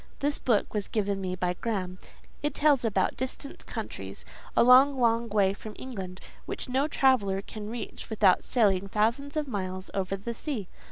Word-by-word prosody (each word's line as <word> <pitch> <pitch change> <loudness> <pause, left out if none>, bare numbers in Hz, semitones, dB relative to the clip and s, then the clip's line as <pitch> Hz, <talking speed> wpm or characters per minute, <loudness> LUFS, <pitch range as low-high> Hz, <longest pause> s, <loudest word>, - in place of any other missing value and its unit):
This 290 +1 0
book 230 -5 +1
was 210 -2 -2
given 200 -2 -1
me 185 -1 -2
by 180 -1 0
Graham; 185 -3 -3 0.4
it 295 +1 -1
tells 290 -4 +4
about 200 -5 +1
distant 260 +2 -5
countries, - - -6 0.3
a - - +7
long, 260 +3 +7
long 230 -1 +2
way 200 -2 +3
from 210 +1 -9
England, 190 -8 -7 0.3
which - - -4
no 265 +3 +1
traveller 255 -10 +3
can 210 0 -7
reach 235 +1 -6
without 205 -4 +4
sailing 200 -5 +2
thousands 235 +9 0
of 300 -1 -1
miles 185 -5 -4
over 195 0 -1
the 205 +5 -5
sea. 230 - -4
215 Hz, 170 wpm, -28 LUFS, 195-260 Hz, 0.4 s, a